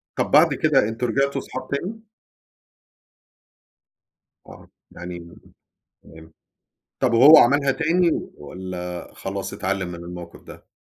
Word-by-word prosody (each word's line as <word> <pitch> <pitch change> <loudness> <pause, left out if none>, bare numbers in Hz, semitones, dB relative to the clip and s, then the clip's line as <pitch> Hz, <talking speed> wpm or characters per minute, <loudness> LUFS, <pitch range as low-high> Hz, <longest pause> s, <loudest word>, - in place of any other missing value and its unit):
طب - - -2
بعد - - +5
كده 105 - +2
أنتم 120 +2 -3
رجعتوا 135 +3 0
صحاب 130 0 -8
تاني؟ 205 +11 -5 2.4
آه، - - -14 0.2
يعني 85 0 -10 0.7
تمام. 80 +1 -16 0.7
طب 125 -3 +1
وهو 140 +7 +8
عملها 140 +2 +4
تاني 165 +3 +1 0.3
والّا 90 +2 -7
خلاص 95 0 -6
اتعلم 95 -1 -3
من 90 - -7
الموقف 85 0 -10
ده؟ - - -15
105 Hz, 110 wpm, -22 LUFS, 90-140 Hz, 2.4 s, وهو